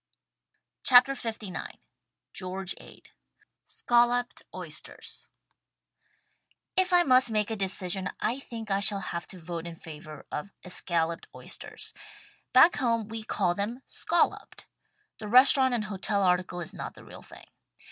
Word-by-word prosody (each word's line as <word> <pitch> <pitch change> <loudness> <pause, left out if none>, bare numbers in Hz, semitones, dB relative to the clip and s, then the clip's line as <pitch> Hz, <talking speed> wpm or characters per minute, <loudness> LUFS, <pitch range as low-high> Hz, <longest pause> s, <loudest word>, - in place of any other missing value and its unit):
THE - - -6
STAG 250 -1 +9
COOK 275 -1 -5
BOOK 225 -1 -4
LIX - - -6 0.6
George 190 0 -3
Ade - - -15 0.6
"SCOLLOPED" 240 +1 +2
OYSTERS - - -6 1.5
If 375 0 +3
I 355 -1 +6
must 255 -4 +5
make 215 0 0
a - - 0
decision, 190 -1 -1
I 240 +5 -1
think 225 -5 -7
I 195 - +2
shall 200 0 +1
have 170 -2 -4
to 185 - -11
vote 170 0 -6
in 170 - -7
favor 155 -2 -10
of 150 +7 -4 0.2
escalloped 170 -2 -1
oysters. - - -6 0.6
Back 345 - +7
home 230 -3 0
we 225 0 -5
call 185 -4 +1
them 225 +7 -3
"scolloped." 345 - -1 0.5
The 215 - -6
restaurant 260 +2 +6
and 225 - -1
hotel 200 0 -1
article 180 -1 +1
is 170 - -5
not - - -6
the - - -13
real - - -11
thing. - - -14
210 Hz, 145 wpm, -28 LUFS, 180-245 Hz, 1.5 s, STAG